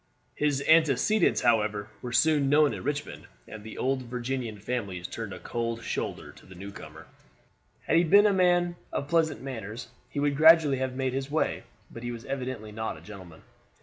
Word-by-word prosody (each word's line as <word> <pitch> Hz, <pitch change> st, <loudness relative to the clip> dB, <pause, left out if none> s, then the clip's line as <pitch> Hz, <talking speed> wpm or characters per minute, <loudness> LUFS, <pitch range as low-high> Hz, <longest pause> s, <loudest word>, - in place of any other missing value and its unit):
His 145 Hz, -2 st, 0 dB
antecedents, 160 Hz, -, +4 dB
however, 105 Hz, -3 st, +1 dB
were 125 Hz, -, -6 dB
soon 145 Hz, +2 st, +3 dB
known 150 Hz, 0 st, +4 dB
at -, -, -6 dB
Richmond, 145 Hz, +2 st, -4 dB, 0.2 s
and 110 Hz, -1 st, -10 dB
the 110 Hz, -, -9 dB
old 130 Hz, 0 st, 0 dB
Virginian 125 Hz, -2 st, -4 dB
families 100 Hz, -5 st, -4 dB
turned 110 Hz, +1 st, -6 dB
a -, -, -7 dB
cold 115 Hz, -1 st, -4 dB
shoulder -, -, -4 dB
to -, -, -18 dB
the 95 Hz, -, -13 dB
newcomer. 80 Hz, -5 st, -10 dB, 0.8 s
Had -, -, +1 dB
he 170 Hz, -, +5 dB
been 200 Hz, +5 st, +6 dB
a 205 Hz, -, +4 dB
man 175 Hz, -2 st, +2 dB
of 140 Hz, -, -3 dB
pleasant 160 Hz, -3 st, +1 dB
manners, 115 Hz, -4 st, -7 dB, 0.2 s
he 145 Hz, -, -4 dB
would 145 Hz, 0 st, +1 dB
gradually 155 Hz, -2 st, +6 dB
have 130 Hz, -1 st, -2 dB
made 130 Hz, -1 st, -1 dB
his 135 Hz, +1 st, -3 dB
way; 155 Hz, +2 st, -1 dB, 0.3 s
but 115 Hz, -, -9 dB
he 120 Hz, 0 st, -4 dB
was 120 Hz, -1 st, -8 dB
evidently 130 Hz, -5 st, -5 dB
not 110 Hz, +1 st, -4 dB
a -, -, -14 dB
gentleman. 95 Hz, -6 st, -12 dB
130 Hz, 180 wpm, -27 LUFS, 110-150 Hz, 0.8 s, been